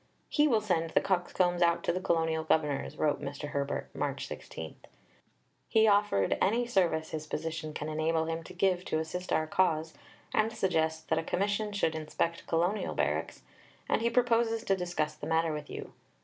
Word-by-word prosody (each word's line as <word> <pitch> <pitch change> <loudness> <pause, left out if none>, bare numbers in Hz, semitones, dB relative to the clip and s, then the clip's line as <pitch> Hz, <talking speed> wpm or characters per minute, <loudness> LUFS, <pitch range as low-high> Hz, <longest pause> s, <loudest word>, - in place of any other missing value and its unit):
"He 300 0 +4
will 225 -6 +3
send 170 -6 0
the - - +3
Coxcombs 180 -1 +1
out 170 0 +3
to - - +1
the 185 - -1
Colonial 160 -2 +1
Governors," 150 -3 0
wrote 150 -1 +1
Mr. 145 +1 -5
Herbert 140 0 -2
(March - - -2
16); 80 -1 -8 0.9
"he 220 0 +5
offered 200 - +3
any 235 +5 +3
service 175 -8 +1
his 155 -1 -4
position 160 0 -4
can 150 - -5
enable 160 +1 0
him 165 0 -2
to 185 - -10
give 185 0 +1
to - - 0
assist 160 +3 -4
our 155 - +2
cause, 160 -2 +1 0.4
and 215 +1 +2
suggests 160 -7 0
that - - 0
a - - -3
Commission 205 +4 0
should 195 -5 +1
inspect 160 +2 -2
Colonial 175 +6 0
barracks, - - -1 0.4
and - - +1
he 235 - +2
proposes 230 -2 +2
to 195 - +2
discuss 175 -4 -2
the 150 - -8
matter 160 0 +2
with 150 -1 -6
you." - - -7
165 Hz, 175 wpm, -30 LUFS, 160-195 Hz, 0.9 s, he